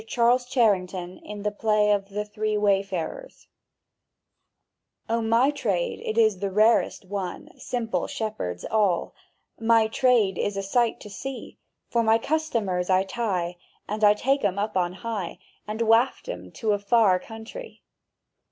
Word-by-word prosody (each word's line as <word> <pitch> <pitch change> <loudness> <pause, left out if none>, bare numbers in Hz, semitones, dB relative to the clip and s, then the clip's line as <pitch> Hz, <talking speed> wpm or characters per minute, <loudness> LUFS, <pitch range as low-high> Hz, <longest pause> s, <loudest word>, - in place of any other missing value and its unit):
CHARLES 245 +2 +2
CHARRINGTON 185 -7 0
in 210 -1 -8
the 210 - 0
play 210 0 +2
of 200 -1 0
"The 210 +1 -3
Three 215 0 -2
Wayfarers") 200 - -1 1.6
O 230 +1 0
MY 230 +5 +3
trade 205 -12 -1
it 220 - -3
is 220 -4 +4
the 200 0 -1
rarest 215 0 +2
one, 190 -1 -5
Simple 240 -3 -2
shepherds 150 - -4
all— 205 -6 +1 0.5
My 225 0 +4
trade 220 -4 +2
is 205 -1 -1
a 195 - -2
sight 230 +4 +1
to 210 - -9
see; 270 +6 -7 0.3
For 235 - +3
my 225 0 +4
customers 225 - -1
I 185 0 +4
tie, 190 -5 -2 0.3
and 210 +1 -4 0.2
take 275 +5 +1
'em 200 -2 +1
up 210 +1 -2
on 180 -1 +1
high, 195 -2 -5 0.3
And 215 +2 -2
waft 230 +3 +2
'em - - -7
to 220 -3 -1
a 205 - +1
far 200 -2 +3
countree! 225 - -10
215 Hz, 145 wpm, -25 LUFS, 195-230 Hz, 1.6 s, is